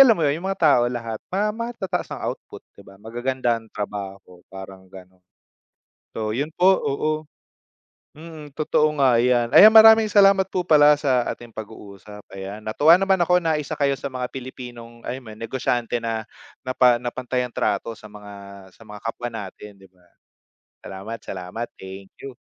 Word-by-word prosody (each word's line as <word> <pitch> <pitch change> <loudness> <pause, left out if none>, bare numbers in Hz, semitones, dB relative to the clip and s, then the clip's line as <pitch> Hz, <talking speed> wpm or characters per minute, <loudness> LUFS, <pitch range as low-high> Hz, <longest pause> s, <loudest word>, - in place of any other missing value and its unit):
alam 230 -5 +5
mo 165 - 0
'yon, 145 +1 +1
yung 190 - -3
mga 195 - -9
tao 145 -7 +4
lahat, 115 -3 -5
ma 205 +3 0
matataas 225 -6 -4
ang - - -7
output, - - -6 0.2
'di 100 - -14
ba? 95 - -16
Magaganda 120 +2 -2
ang 110 - -19
trabaho, 100 -3 -7
parang 95 0 -10
gano'n. 95 -1 -15 0.9
So, 110 -1 -2
yun 145 +4 -2
po, 180 +1 +4
oo. 145 +2 -1 1.0
Mm, 155 -1 -11
totoo 155 0 +1
nga 130 -4 +4
'yan. 120 -1 +1
Ayan, 210 - +10
maraming 220 0 +8
salamat 195 -2 +4
po 180 -1 -2
pala 150 -2 +5
sa 130 -5 +1
ating 120 -1 -7
pag-uusap, 105 -1 -11
ayan. 100 +2 -8
Natuwa 150 +10 +5
naman 190 -1 +1
ako 180 +1 +3
na 160 -2 +1
isa 145 - -5
kayo 140 -1 +2
sa 140 - -5
mga 125 -1 -4
Pilipinong 120 -2 -10
ay 130 - -4
man 110 -3 -12
negosyante 120 0 -2
na 115 -1 -3 0.4
na 130 - -1
pa 125 -2 +5
na 120 0 -4
pantay 125 0 -3
ang 125 - -8
trato 115 - -1
sa 110 - -14
mga 105 -1 -12 0.4
sa - - -20
mga 105 0 -10
kapwa 115 +2 -4
natin, 105 -1 -9
'di 95 - -17
ba? 90 -1 -29 0.8
Salamat, 100 +4 -7
salamat. 95 +5 -6
Thank 95 +1 -10 0.2
you. 135 -2 -8
120 Hz, 175 wpm, -22 LUFS, 105-150 Hz, 1.0 s, Ayan